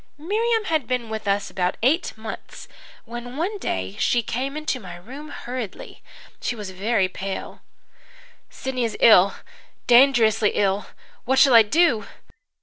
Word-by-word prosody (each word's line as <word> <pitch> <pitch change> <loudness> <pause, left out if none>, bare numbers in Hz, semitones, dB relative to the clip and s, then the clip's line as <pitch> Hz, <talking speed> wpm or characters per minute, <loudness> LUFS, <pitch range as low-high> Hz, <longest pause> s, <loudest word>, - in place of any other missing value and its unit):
"Miriam 440 +8 0
had 315 - -1
been 245 -3 -2
with 220 -1 -5
us 200 0 0
about 180 -1 -1
eight 295 +1 +1
months 220 0 -9 0.4
when 240 +2 -8
one 390 +6 -2
day 95 - -3
she 240 -1 +2
came 270 +6 -3
into 305 -4 -2
my 180 -5 -9
room 265 +12 -10
hurriedly. 245 -7 -7 0.4
She 245 - -2
was 205 -4 -7
very 195 +1 0
pale. 190 +1 -6 0.9
"'Sidney 260 -2 -4
is 225 -2 -2
ill 200 -4 +6 0.5
dangerously 235 -4 +4
ill. 195 -1 0 0.4
What 265 +2 +1
shall 270 -1 +6
I 230 - +10
do?' 230 - +2
235 Hz, 145 wpm, -23 LUFS, 205-275 Hz, 0.9 s, I